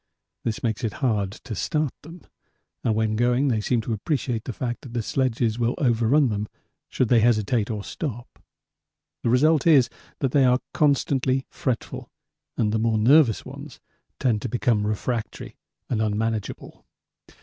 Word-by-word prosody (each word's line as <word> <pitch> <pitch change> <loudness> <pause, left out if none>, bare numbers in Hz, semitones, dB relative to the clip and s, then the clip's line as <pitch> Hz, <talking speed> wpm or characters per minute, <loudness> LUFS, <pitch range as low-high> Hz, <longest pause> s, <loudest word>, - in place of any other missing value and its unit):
This 110 -2 -3
makes 110 -2 -1
it 110 - -1
hard 105 -5 +1
to 120 +1 -8
start 150 - -1
them, 165 +3 -12 0.6
and 110 - +1
when 110 0 0
going 125 +4 +2
they 110 -4 +1
seem 120 +2 +1
to 115 +1 -3
appreciate 120 - -2
the - - -3
fact 120 0 -4
that 125 -4 -10
the 120 - -1
sledges 120 -2 0
will 120 +1 +1
overrun 125 +2 +3
them 105 0 -2 0.4
should 130 - 0
they 120 0 +5
hesitate 110 -1 +2
or 105 -3 -3
stop. 120 -3 -6 0.8
The - - 0
result 150 +5 +3
is 135 -7 +5 0.3
that 135 -3 -1
they 140 0 +4
are 125 -1 +4 0.2
constantly 135 -3 +1
fretful 125 -4 -3 0.5
and 105 -2 +1
the 110 - 0
more 110 0 +1
nervous 120 +1 +4
ones - - -10 0.4
tend 115 -5 +1
to 125 - -3
become 110 -3 +1
refractory 110 +2 -3 0.3
and 110 -3 -1
unmanageable. 110 -1 -3
120 Hz, 160 wpm, -24 LUFS, 110-130 Hz, 0.8 s, they